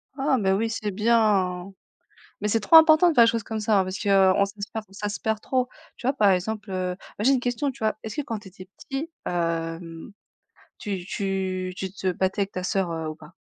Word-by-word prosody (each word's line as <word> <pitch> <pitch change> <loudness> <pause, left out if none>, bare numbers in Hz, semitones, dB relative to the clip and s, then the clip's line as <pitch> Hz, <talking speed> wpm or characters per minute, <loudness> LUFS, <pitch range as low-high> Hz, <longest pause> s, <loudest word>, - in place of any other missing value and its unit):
Oh 270 -1 +1
mais, 190 -2 +2
oui, 225 +4 +1
c'est 215 -2 -3
bien. 200 -4 +2 0.7
Mais 210 - -1
c'est 225 +1 +2
trop 325 +10 +6
important 320 +2 +7
de 325 - +1
faire 235 -2 +7
des 230 - +5
choses 230 -2 -2
comme 220 0 -4
ça, 210 -2 +3
hein, - - +1
parce 185 +1 -5
qu'on 195 -1 +4
ça 200 +1 -10
se 205 - -4
perd 220 -1 -5
ça 205 +1 -4
se 205 - -5
perd 220 -1 -1
trop. 255 +1 0 0.3
Tu 245 - -7
vois, 270 - +3
par 210 -7 +4
exemple, 205 +3 -1
heu 185 -1 -2 0.3
moi, 210 - -2
j'ai 270 - +5
une 260 - +2
question, 250 +3 -1
tu 270 - -13
vois? 215 -1 +1
Est-ce 220 0 -7
que 295 - -1
quand 225 -5 -4
tu 200 - -12
étais 185 0 -13
petit, 290 +5 -5
hem, 165 +1 -3 0.7
tu 195 -4 -4
tu 185 -2 -2
tu 190 -1 -4
te 190 -2 -2
battais 190 +3 -1
avec 195 - -4
ta 185 - -4
sœur, 190 -3 0
heu, 160 -1 -3
ou 155 - -5
pas? 155 +2 -16
205 Hz, 240 wpm, -25 LUFS, 185-225 Hz, 0.7 s, important